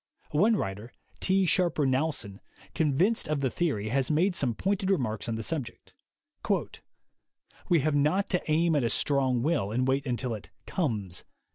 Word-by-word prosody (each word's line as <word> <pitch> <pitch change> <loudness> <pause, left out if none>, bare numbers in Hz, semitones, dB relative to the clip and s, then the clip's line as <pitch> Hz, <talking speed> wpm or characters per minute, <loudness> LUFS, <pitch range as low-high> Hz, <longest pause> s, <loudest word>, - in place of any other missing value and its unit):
One 205 +10 +4
writer, 105 - -4 0.3
T. 190 0 +2
Sharper 170 -4 +2
Knowlson, 130 -7 -1 0.3
convinced 165 +9 +1
of 150 -2 -1
the 130 -3 0
theory, 125 -12 -1
has 135 +2 +1
made 175 +5 +2
some 125 -8 0
pointed 195 - -1
remarks 120 - 0
on 115 - -1
the 110 - -4
subject: 130 -4 -5 1.8
"We 170 -4 +4
have 155 +2 +1
not 150 +8 +2
to 180 - +2
aim 165 +1 +3
at 145 - +2
a 115 - +1
strong 130 -3 +1
will, 150 -10 +1
and 125 +3 0
wait 135 +1 0
until 125 -1 -1
it 105 - -8 0.2
'comes.' 110 - -2
140 Hz, 160 wpm, -28 LUFS, 120-170 Hz, 1.8 s, One